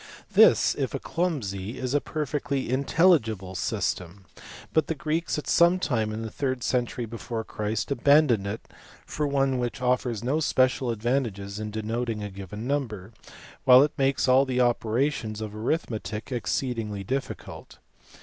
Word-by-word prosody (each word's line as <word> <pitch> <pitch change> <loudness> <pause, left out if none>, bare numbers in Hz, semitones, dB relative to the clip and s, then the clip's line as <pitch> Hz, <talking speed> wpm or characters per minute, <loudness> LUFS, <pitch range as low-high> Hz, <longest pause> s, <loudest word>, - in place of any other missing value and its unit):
This, - - +6
if - - -3
a - - -2
clumsy, 115 - -3
is 130 0 -3
a 145 - +2
perfecly 140 -3 -2
intelligible 130 - +2
system; 90 0 -3 0.5
but 160 -2 +2
the 165 - -1
iGreeks 155 +3 -1
at 150 - -4
some 170 +2 +5
time 115 -11 -1
in 110 +1 -4
the 110 - -5
third 130 -3 -2
century 125 -1 -1
before 115 0 -5
Christ 105 0 -3
aban 140 +3 +5
doned 105 -5 +1
it 105 +3 -4 0.4
for 150 -1 -2
one 135 -2 +1
which 120 +2 -3
offers 125 -3 0
no 135 +6 +1
special 130 -4 +2
advantages 110 -4 -2
in 110 0 -4
denoting 110 +1 -3
a 105 - -5
given 100 +3 -7
number, 115 -8 -3 0.5
while 130 0 +8
it 150 - -1
makes 135 -1 +1
all 130 +1 +6
the 130 -2 -1
operations 120 -1 0
of 110 -1 -5
arithmetic 110 - -3
(exceedingly 115 -4 -2
difficult. 135 +7 -5
125 Hz, 150 wpm, -26 LUFS, 110-140 Hz, 0.5 s, while